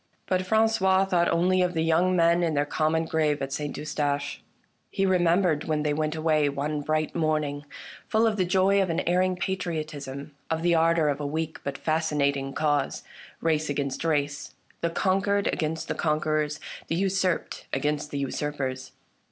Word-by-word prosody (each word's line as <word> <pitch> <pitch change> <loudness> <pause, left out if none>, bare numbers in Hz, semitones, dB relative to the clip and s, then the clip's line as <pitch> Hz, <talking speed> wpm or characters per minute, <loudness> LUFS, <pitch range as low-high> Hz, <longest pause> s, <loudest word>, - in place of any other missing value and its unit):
But 185 -1 +1
Franqois 195 -3 +3
thought 175 -3 +2
only 185 +2 +2
of 180 -1 0
the 160 - +1
young 170 +3 +3
men 170 0 +4
in 165 -3 0
their 145 0 +2
common 160 +2 0
grave 155 -2 +1
at 135 0 -4
St. 145 +1 -3
Eustache. 145 -1 -2 0.5
He 195 - 0
remembered 175 -3 +2
when 155 -1 0
they 150 -1 +1
went 155 +1 -1
away 155 -2 +2
one 145 +2 -2
bright 155 +1 -1
morning, 155 -3 -1 0.4
full 220 +1 +2
of 220 -2 +2
the 190 - +1
joy 190 +2 +3
of 190 - 0
an 165 - 0
erring 185 +1 +1
patriotism, 155 -6 -4 0.2
of 160 0 -1
the 175 0 +3
ardor 165 -1 +3
of 145 -1 0
a 145 - -2
weak 160 +2 -3
but 140 0 -4
fascinating 145 -4 0
cause: 145 -1 0 0.4
race 155 -2 +1
against 140 -1 -2
race, 145 -3 -1 0.3
the 170 - +1
conquered 195 +3 +1
against 160 -1 -1
the - - -1
conquerors, 155 -1 0 0.3
the 165 - -1
usurped 190 -1 -1
against 150 +2 -1
the 145 - -4
usurpers. 135 -1 -3
155 Hz, 170 wpm, -26 LUFS, 145-175 Hz, 0.5 s, men